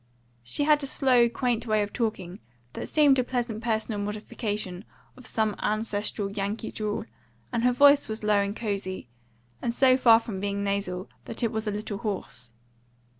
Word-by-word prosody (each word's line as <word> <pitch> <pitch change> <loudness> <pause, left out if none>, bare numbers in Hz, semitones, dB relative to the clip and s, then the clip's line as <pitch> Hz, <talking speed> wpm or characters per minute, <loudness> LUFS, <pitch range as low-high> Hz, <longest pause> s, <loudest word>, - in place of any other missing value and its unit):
She 125 - -1
had 300 0 +4
a - - -2
slow, 250 -3 +4
quaint 240 -1 -1
way 215 -1 +2
of 205 - -6
talking, 210 -5 -3 0.3
that - - -5
seemed 285 -4 +5
a - - +3
pleasant 240 -3 -3
personal 220 -2 -1
modification 210 -2 -4 0.3
of 255 -3 -7
some 220 -2 +1
ancestral 210 -1 -1
Yankee 205 +2 -3
drawl, 210 -1 -3 0.5
and 235 - 0
her 250 - +5
voice 280 +1 +5
was 220 0 -4
low 210 -1 +3
and 200 +1 -1
cozy, 195 - -4 0.5
and 235 0 -2
so 260 -1 +5
far 230 -3 +7
from 225 -4 -5
being 200 0 -2
nasal 200 -2 -2 0.2
that 230 - -6
it 230 - +1
was 220 0 -3
a - - +1
little 205 -1 -4
hoarse. 185 - -5
215 Hz, 175 wpm, -27 LUFS, 200-240 Hz, 0.5 s, far